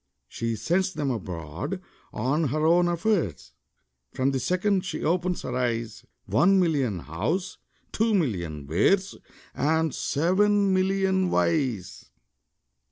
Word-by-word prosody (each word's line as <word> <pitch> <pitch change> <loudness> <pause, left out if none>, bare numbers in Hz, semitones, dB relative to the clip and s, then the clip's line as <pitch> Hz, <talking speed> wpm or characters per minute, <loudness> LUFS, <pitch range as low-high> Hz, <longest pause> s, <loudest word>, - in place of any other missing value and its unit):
She 115 - -3
sends 180 - 0
'em 145 -3 0
abroad 90 - -5 0.3
on 140 +8 0
her 155 +3 0
own 175 +2 +4
affairs, 170 - -1 0.6
From 130 +1 +1
the 135 - -1
second 185 - +1
she 180 -4 -4
opens 180 +2 0
her 125 - -4
eyes 115 -3 -2 0.2
One 180 - +4
million 140 - +1
Hows, 120 - -3 0.3
two 220 0 +1
million 85 - -2
Wheres, 185 - +2 0.4
And 160 0 +1
seven 195 +5 +2
million 190 0 +1
Whys! 125 - -1
160 Hz, 115 wpm, -26 LUFS, 115-185 Hz, 0.6 s, own